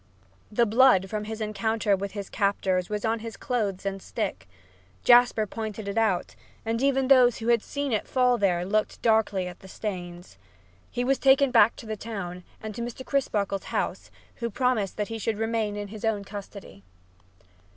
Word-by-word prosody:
The 235 +3 +3
blood 220 -4 +4
from 210 -1 -3
his 220 +1 -6
encounter 215 0 0
with 195 +1 -5
his 200 -2 -5
captors 190 -3 0
was 210 +1 -2
on 225 +1 +1
his 225 0 -7
clothes 210 -8 -2
and 195 -1 -3
stick. - - -4 0.5
Jasper 240 -3 +5
pointed 215 0 -6
it 200 - -3
out, 215 -6 +1 0.3
and 225 +1 -1
even 270 -1 +2
those 255 -3 +6
who 230 +1 -3
had 235 -2 +4
seen 285 +2 -3
it 215 - -1
fall 250 -2 +2
there 180 -3 +1
looked 210 +3 -1
darkly 220 -5 +2
at 180 - -9
the 190 - -13
stains. 180 -3 -7 0.5
He 245 - -2
was 270 +2 +1
taken 275 0 +5
back 225 -2 +5
to - - -11
the 215 0 -3
town 190 -5 -6 0.2
and 215 -1 -6
to 235 - -6
Mr. 240 +2 -6
Crisparkle's 205 -8 -1
house, - - -3 0.3
who 235 -1 -2
promised 230 -3 0
that 210 0 -2
he 225 0 -4
should 220 0 -1
remain 225 -1 -1
in 205 -1 -5
his 215 0 -9
own 220 -3 0
custody. 200 - -10
215 Hz, 180 wpm, -26 LUFS, 200-235 Hz, 0.5 s, those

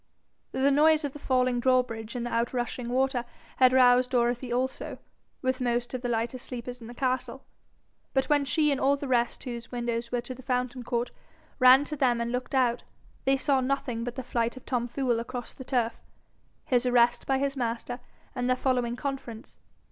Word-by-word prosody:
The 275 +2 +2
noise 305 +2 +4
of 280 - -4
the 295 - -9
falling 255 -2 +1
drawbridge 240 -3 +1
and 240 -1 -2
the 240 - -4
out 235 +2 0
rushing 240 0 -3
water 260 0 +1 0.3
had 255 -1 +6
roused 250 -1 +5
Dorothy 245 0 0
also, 255 +2 -2 0.5
with 260 0 0
most 240 0 -1
of 255 - -3
the 245 - -2
lighter 235 +2 -1
sleepers 245 0 -7
in 225 - -9
the 240 - -10
castle; 255 0 -2 0.7
but 265 -1 +1
when 290 -1 +3
she 300 +2 +2
and 275 - -1
all 280 +1 +3
the 280 - -5
rest 240 -2 +1
whose 235 -2 -6
windows 235 -1 -2
were 245 -1 0
to 255 - -6
the 255 - -12
fountain 250 0 -2
court, 240 0 -2 0.5
ran 255 +2 +8
to 300 - -4
them 250 -4 +2
and 235 0 -2
looked 250 +2 -3
out, 245 -2 +2 0.4
they 270 0 +3
saw 270 0 +2
nothing 255 -3 -1
but 245 0 -4
the 260 - -4
flight 235 0 -1
of 255 - -12
Tom 245 -2 -1
Fool 245 -1 0
across 245 +1 -6
the 260 - -9
turf, 245 -3 -1 0.7
its 250 0 +3
arrest 240 -1 +3
by 270 - +2
his 275 0 -1
master, 240 0 -3 0.3
and 250 0 -1
their 255 - +3
following 250 -2 0
conference. 255 -4 -6
250 Hz, 195 wpm, -28 LUFS, 240-265 Hz, 0.7 s, ran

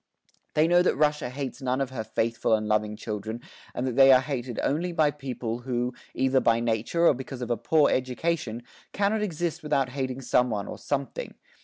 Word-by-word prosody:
They 155 +1 +4
know 175 +1 +5
that 180 - +2
Russia 150 -3 +1
hates 135 +1 -5
none 130 0 0
of 135 -1 -2
her 120 -4 -4
faithful 110 +1 0
and 110 0 -3
loving 105 0 +1
children 110 +1 -5 0.4
and 125 - -1
that 125 -2 -2
they 135 0 +8
are 130 - +8
hated 130 -3 -4
only 170 +5 0
by 155 -3 +3
people, 125 -5 -4
who, 125 0 -2 0.2
either 130 +1 +3
by 115 -2 +3
nature 115 +9 0
or - - +7
because 130 0 -6
of 120 - -4
a - - +3
poor 145 +6 +3
education, 130 -2 -1 0.3
cannot 205 +2 +1
exist 175 -3 -2
without 140 -4 0
hating 130 0 -3
some 125 -1 +2
one 105 -3 -3
or - - -7
something. 140 -1 -3
130 Hz, 195 wpm, -27 LUFS, 120-150 Hz, 0.4 s, they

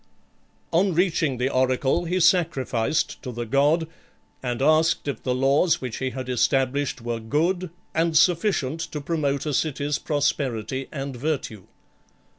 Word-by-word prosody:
On 180 +1 +2
reaching 165 -6 +1
the 125 +2 0
oracle, 130 +6 +1
he 180 +2 0
sacrificed 160 -7 +1
to 125 - -6
the 120 0 -4
god, 145 +7 +2 0.5
and 125 -2 -3
asked 155 +3 +3
if 140 -5 -3
the 125 -1 -1
laws 135 +6 +3
which 125 -4 -5
he 130 - -2
had 130 0 -6
established 130 +1 0
were 120 -1 -2
good, 165 +10 0 0.2
and 165 0 +2
sufficient 165 -4 +2
to 160 -2 -4
promote 145 -2 -1
acity's 145 -1 -1
prosperity 135 -4 -1
and 135 -2 -5
virtue. 120 - -3
140 Hz, 135 wpm, -24 LUFS, 130-160 Hz, 0.5 s, asked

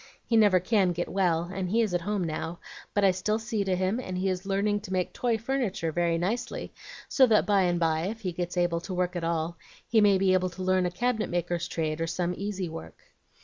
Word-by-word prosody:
He 230 - 0
never 205 -4 +6
can 185 -1 +2
get 175 +1 -3
well, 175 -4 +1
and 190 -2 -3
he 225 +5 +2
is 210 -5 -2
at 175 - +1
home 205 +1 -1
now; 165 +1 -4 0.4
but 205 - +2
I 190 - +6
still 190 +4 -1
see 225 -2 -2
to 190 -1 0
him, 185 +5 0
and 185 -7 -4
he 190 +1 0
is 185 +1 -3
learning 205 +1 +1
to 205 -2 -10
make 185 -1 -1
toy 235 -2 0
furniture 225 -8 -1
very 170 0 +1
nicely, 210 +9 -3 0.3
so 265 -3 +5
that 220 -2 +4
by 200 -2 +3
and 175 -1 +1
by, 160 0 +1
if 225 +2 -5
he 185 -4 -2
gets 175 +1 -4
able 175 -1 +1
to 185 +1 -5
work 180 0 -1
at 175 - -3
all, 165 0 -1 0.3
he 225 -2 +4
may 200 -2 +5
be 190 0 +3
able 185 0 +2
to 185 +1 -7
learn 185 -1 +2
a - - -1
cabinet 225 +4 -1
maker's 175 0 -1
trade, 160 -2 -2
or 165 - 0
some 175 +2 -1
easy 195 -2 -3
work. 165 0 -9
185 Hz, 240 wpm, -28 LUFS, 175-205 Hz, 0.4 s, never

